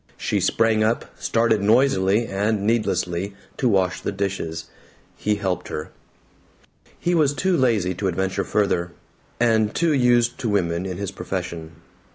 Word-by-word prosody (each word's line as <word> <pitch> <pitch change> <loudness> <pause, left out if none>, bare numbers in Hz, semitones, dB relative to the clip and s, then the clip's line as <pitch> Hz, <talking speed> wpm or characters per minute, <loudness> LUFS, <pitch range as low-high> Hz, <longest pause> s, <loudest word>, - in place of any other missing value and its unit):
She - - -1
sprang 110 -1 +2
up, 110 +2 +1
started 115 -2 +2
noisily 110 -2 +3
and 100 0 -1
needlessly 100 -4 0 0.2
to 125 - +2
wash 95 -3 +1
the - - -2
dishes. 95 -5 -3 0.5
He 105 0 0
helped 95 -3 -2
her. 75 - -5 1.1
He 175 - 0
was 150 -4 +3
too 185 +2 +1
lazy 110 - +2
to 95 +2 -2
adventure 95 +1 -1
further 90 -4 0 0.5
and 110 -3 +2
too 165 -2 +2
used 120 -2 +3
to 120 - -1
women 90 -3 0
in 90 -2 -5
his 100 -1 -4
profession. 80 -1 -5
105 Hz, 145 wpm, -23 LUFS, 95-115 Hz, 1.1 s, noisily